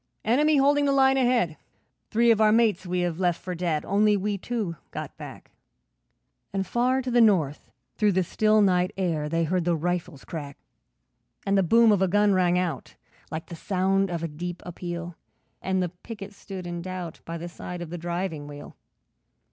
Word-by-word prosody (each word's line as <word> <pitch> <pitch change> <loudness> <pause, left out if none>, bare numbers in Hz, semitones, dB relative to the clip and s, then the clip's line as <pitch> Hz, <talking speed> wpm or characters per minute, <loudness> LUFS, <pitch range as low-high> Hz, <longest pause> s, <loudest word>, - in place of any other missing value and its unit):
'Enemy 295 +7 +3
holding 285 +1 +4
the 280 - +2
line 270 -1 +4
ahead, 245 -11 +2 0.5
Three 235 +1 +4
of 220 -1 +3
our 215 0 +5
mates 215 -5 +2
we 180 0 0
have 175 -1 -2
left 175 -2 +1
for 180 - -5
dead, 170 -3 -1
Only 205 +1 +3
we 205 +1 -1
two 200 -3 -3
got - - -7
back.' - - -11 1.0
And 195 -1 -1
far 250 +6 +1
to 250 - -3
the 240 0 +5
north 170 -10 +2 0.3
through 210 -2 +3
the 185 0 +2
still 215 +4 +3
night 180 -2 +3
air, 165 -6 -1
They 165 +1 +1
heard 180 +2 0
the 170 0 +1
rifles 175 -2 -3
crack. 145 -4 -7 0.9
And 195 - +2
the 195 - +4
boom 225 +5 +5
of 200 -2 +2
a 190 - +4
gun 205 +2 +3
rang 180 -1 +3
out, 175 -7 -3 0.3
Like 160 0 -5
the 170 - -9
sound 195 +2 +1
of 170 -1 -3
a - - 0
deep 175 +3 -6
appeal, 175 -1 -6 0.4
And 190 -1 0
the 175 - -2
picket 200 +3 -10
stood 190 -2 -8
in 175 0 -4
doubt 180 -2 -6
By 165 0 -5
the 170 +1 -6
side 175 0 -7
of 165 - -9
the 175 - -4
driving 170 -3 -3
wheel. 145 0 -10
185 Hz, 190 wpm, -26 LUFS, 170-210 Hz, 1.0 s, our